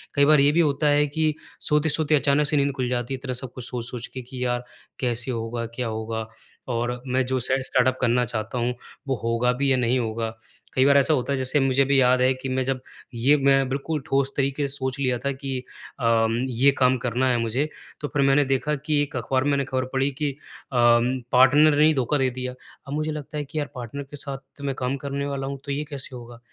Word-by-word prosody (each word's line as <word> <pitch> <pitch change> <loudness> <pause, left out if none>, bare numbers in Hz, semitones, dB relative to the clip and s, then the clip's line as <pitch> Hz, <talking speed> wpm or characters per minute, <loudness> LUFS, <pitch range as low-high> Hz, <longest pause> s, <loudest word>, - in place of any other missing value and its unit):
कई 140 -1 +5
बार 150 0 +6
ये 140 +1 +5
भी 160 - +1
होता 150 -2 +2
है 145 0 +4
कि 155 +1 0 0.3
सोते-सोते 155 0 +2
अचानक 145 +1 +3
से 150 - +1
नींद 140 0 +2
खुल 130 -2 -1
जाती 125 +1 -2
है, - - -2
इतना 130 -2 -3
सब 125 0 -3
कुछ 125 - -4
सोच-सोच 120 -1 -4
के 130 - -5
कि, 125 +1 -6
यार 120 0 -1 0.4
कैसे 125 0 -1
होगा, 115 0 -3
क्या 125 -1 -2
होगा? 110 0 -4 0.4
और 120 +1 -2
मैं 130 0 +1
जो 130 +1 0
सेट 130 +2 +1
स्टार्टअप 130 0 +2
करना 125 0 +3
चाहता 115 +1 -3
हूँ, 120 +1 0 0.3
वो 135 - +1
होगा 115 +2 +2
भी 135 +2 0
या 130 - +3
नहीं 125 +1 +2
होगा? 115 -1 -2 0.4
कई 130 - +3
बार 140 0 +6
ऐसा 140 +3 +4
होता 140 0 0
है, 140 - 0
जैसे 130 +3 +1
मुझे 135 0 +3
भी 140 0 +3
याद 125 0 +4
है 130 +1 +4
कि 130 +1 -6
मैं 130 0 0
जब, 130 -1 -1 0.3
ये 130 +6 +3
मैं 135 -1 +3
बिल्कुल 140 +3 -2
ठोस 140 -2 +1
तरीके 140 +1 0
से 135 - -3
सोच 130 -1 -3
लिया 130 -3 +1
था 140 - +2
कि 135 -1 -4 0.4
अम, 115 -2 +2
ये 130 +3 +4
काम 130 0 +4
करना 125 +2 0
है 125 - +2
तो 120 - 0
मुझे, 120 +6 0 0.3
तो 145 - -2
फिर 145 - -1
मैंने 135 +1 +4
देखा 135 +3 0
कि 150 +1 0
एक 145 -2 -3
अखबार 130 +2 0
में 145 - +1
मैंने 140 -1 +1
खबर 130 0 -1
पढ़ी 135 +1 +1
कि 145 -2 +1
अ, - - -13 0.4
पार्टनर 125 +5 +4
ने 150 - +6
ही 155 - +5
धोखा 135 +1 +1
दे 130 -2 +2
दिया। 125 0 -5 0.3
अब 140 - -5
मुझे 155 +1 -1
लगता 150 0 -6
है 150 - -1
कि 150 - -8
यार 145 - -3
पार्टनर 125 +3 -6
के 140 +2 -10
साथ 135 0 -7
मैं 140 -1 -2
काम 130 +1 -2
करने 140 +1 -3
वाला 140 -1 -3
हूँ, 140 0 -5
तो 140 - -3
ये 145 +2 -1
कैसे 135 -2 -7
होगा? 120 -1 -10
130 Hz, 240 wpm, -24 LUFS, 125-140 Hz, 0.4 s, बार